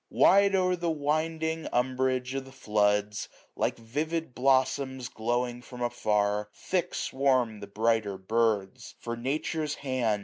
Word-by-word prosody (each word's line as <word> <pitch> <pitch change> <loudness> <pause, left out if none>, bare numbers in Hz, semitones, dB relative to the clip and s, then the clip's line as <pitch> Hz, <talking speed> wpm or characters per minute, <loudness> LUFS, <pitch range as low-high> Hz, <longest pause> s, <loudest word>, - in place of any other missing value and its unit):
Wide 200 +1 +5
o'er 185 -1 +2
the 170 -1 -2
winding 160 +1 -1
umbrage 130 0 0
of 135 0 -3
the 135 - -12
floods. 105 -4 0 0.3
Like - - 0
vivid 150 +6 -3
blossoms 130 0 +1
glowing 120 +2 -1
from 125 0 -7
afar, 105 -3 0
Thick 180 -1 -2
swarm 130 -5 +1
the 100 - -8
brighter 110 -1 +1
birds. 105 0 -1
For 120 0 -5
Nature's 150 +4 -2
hand. 125 -6 0
125 Hz, 130 wpm, -28 LUFS, 110-150 Hz, 0.3 s, Wide